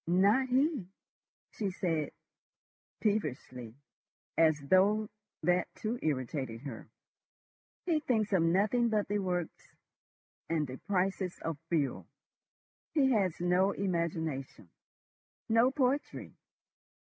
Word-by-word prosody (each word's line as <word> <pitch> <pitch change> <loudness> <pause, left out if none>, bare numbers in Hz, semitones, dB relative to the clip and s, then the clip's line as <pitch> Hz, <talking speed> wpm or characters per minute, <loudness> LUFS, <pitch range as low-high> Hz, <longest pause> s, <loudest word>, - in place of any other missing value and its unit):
"Not 200 +9 +4
he," 265 - +1 0.6
she 205 -3 -2
said 165 -5 -1 0.9
peevishly, 130 - -2 0.6
as 155 -2 +4
though 195 +8 +3 0.3
that 180 +2 +2
too 230 +3 -3
irritated 130 -5 -2
her. 130 -5 -8 1.0
"He 330 -4 +2
thinks 220 -8 0
of 185 - +4
nothing 205 +8 +3
but 215 -2 +1
the 205 +1 0
works 180 -3 -4 0.7
and 160 -2 +1
the 130 -1 -7
prices 190 -1 0
of 160 -3 -3
fuel. 150 -5 0 0.9
He 270 -3 +4
has 195 -7 +1
no 180 +3 +3
imagination, 160 - -3 0.8
no 230 +3 +4
poetry." 270 +1 -1
185 Hz, 100 wpm, -32 LUFS, 155-215 Hz, 1.0 s, Not